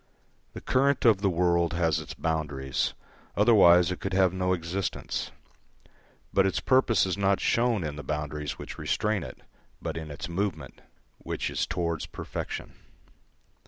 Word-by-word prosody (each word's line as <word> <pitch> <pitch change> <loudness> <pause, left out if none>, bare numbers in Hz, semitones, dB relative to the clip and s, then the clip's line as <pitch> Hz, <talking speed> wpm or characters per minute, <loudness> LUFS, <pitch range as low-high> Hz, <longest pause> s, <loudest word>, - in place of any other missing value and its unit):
The - - -8
current 135 0 +2
of 110 -4 +5
the 100 - +3
world 85 -1 +2
has 85 -2 +1
its - - -8
boundaries, 75 -5 -2 0.4
otherwise 90 -6 +6
it 90 - -4
could 95 - -4
have 95 -1 +3
no 90 0 0
existence, 90 +2 -2 1.0
but 95 0 +4
its 95 - 0
purpose 125 -7 +3
is 95 +1 -2
not 100 0 +2
shown 115 -5 +1
in 75 -2 -4
the 75 - -6
boundaries 75 -1 -4
which - - -8
restrain 105 -2 0
it, - - -9 0.4
but 80 -1 -4
in 80 -1 -6
its 75 - -6
movement, 85 -6 -3 0.4
which - - -3
is - - -1
towards 85 -3 -2
perfection. - - -6
90 Hz, 150 wpm, -27 LUFS, 80-100 Hz, 1.0 s, otherwise